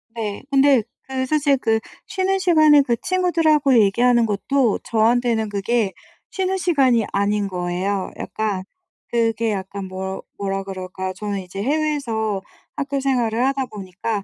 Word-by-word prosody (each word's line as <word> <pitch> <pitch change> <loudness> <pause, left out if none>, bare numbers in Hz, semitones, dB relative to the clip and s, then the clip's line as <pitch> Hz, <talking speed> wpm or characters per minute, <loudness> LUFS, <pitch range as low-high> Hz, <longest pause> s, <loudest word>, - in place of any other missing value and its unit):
네. 210 -3 -4
근데 275 -3 +5 0.2
그 260 -1 -3
사실 285 0 +2
그 225 -3 +1 0.3
쉬는 385 0 0
시간에 310 -5 +6
그 245 -4 +1
친구들하고 325 -7 +3
얘기하는 235 +4 +4
것도 225 +3 +1
저한테는 230 0 +1
그게 205 0 0 0.4
쉬는 380 0 -1
시간이 270 - +3
아닌 200 +1 +1
거예요. 185 +1 -2
약간 205 -4 -3 0.4
그게 230 -1 0
약간 195 0 -4
뭐 190 +1 -5 0.2
뭐라 195 -1 -2
그럴까? 185 -1 -5
저는 200 +1 -4
이제 185 +2 -7
해외에서 245 -8 -1 0.3
학교 280 -1 -2
생활을 245 -3 +1
하다 270 -1 0
보니까 205 0 -4
230 Hz, 295 characters per minute, -21 LUFS, 200-275 Hz, 0.4 s, 시간에